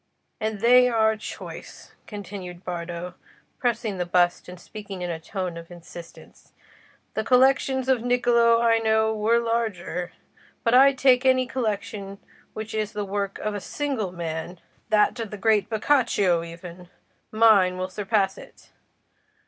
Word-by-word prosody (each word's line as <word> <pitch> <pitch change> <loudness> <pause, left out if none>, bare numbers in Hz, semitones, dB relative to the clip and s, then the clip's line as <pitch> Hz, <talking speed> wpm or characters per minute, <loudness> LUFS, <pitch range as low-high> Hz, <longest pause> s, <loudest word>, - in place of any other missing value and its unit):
And 215 -2 -3
they 250 +1 +6
are 220 -2 +2
choice," 215 - -10
continued 190 -3 -8
Bardo, 175 0 -5 0.5
pressing 230 -6 -1
the 180 - -1
bust 175 0 +1
and 180 0 -10
speaking 200 -1 -8
in 175 - -3
a 165 - -5
tone 180 0 -5
of 165 - -13
insistence. 175 -1 -13 0.6
"The 220 - -2
collections 265 +1 +3
of 260 -2 +3
Niccolò 235 -1 +3
I 230 -1 +4
know 220 0 +2
were 220 +2 +2
larger; 220 -7 -2 0.5
but 265 +3 +5
take 255 -1 +4
any 260 -1 +3
collection 205 -5 -4 0.4
which 220 +1 -6
is 215 -1 -2
the 210 -1 -3
work 200 0 -3
of 215 - -3
a 205 - -4
single 260 -6 -3
man—that 175 +6 -2
of 225 -2 -4
the 210 - -7
great 210 -1 +2
Boccaccio 220 -7 +2
even—mine 180 +3 0
will 185 0 -3
surpass 195 -1 0
it. - - -16
210 Hz, 135 wpm, -24 LUFS, 180-235 Hz, 0.6 s, they